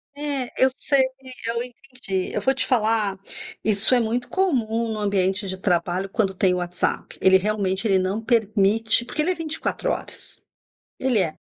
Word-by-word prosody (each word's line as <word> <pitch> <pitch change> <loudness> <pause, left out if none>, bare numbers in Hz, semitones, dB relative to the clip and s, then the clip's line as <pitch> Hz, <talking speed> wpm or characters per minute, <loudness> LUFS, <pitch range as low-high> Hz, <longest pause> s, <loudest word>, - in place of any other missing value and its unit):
É, 285 -4 -3
eu 260 - +6
sei 280 -1 +3 0.5
eu 230 0 -1
entendi. 245 -6 -3
Eu 210 - -1
vou 265 +6 +2
te 270 - 0
falar: 220 -4 +2 0.5
isso 215 +3 +2
é 245 - +4
muito 235 +2 -1
comum 235 -11 0
no 215 - -5
ambiente 195 -1 0
de 190 0 -3
trabalho 180 +1 0
quando 195 -2 0
tem 185 -1 +2
WhatsApp. 180 -1 -2
Ele, 190 0 +6
realmente, 200 0 -1
ele 190 -2 +3
não 190 +4 -1
permite 220 0 +2
porque 300 - -2
ele 355 +4 +2
é - - -1
24 330 +9 -2
horas. - - 0 0.6
Ele 260 -4 +1
é. 165 -4 -1
215 Hz, 165 wpm, -23 LUFS, 190-250 Hz, 0.6 s, eu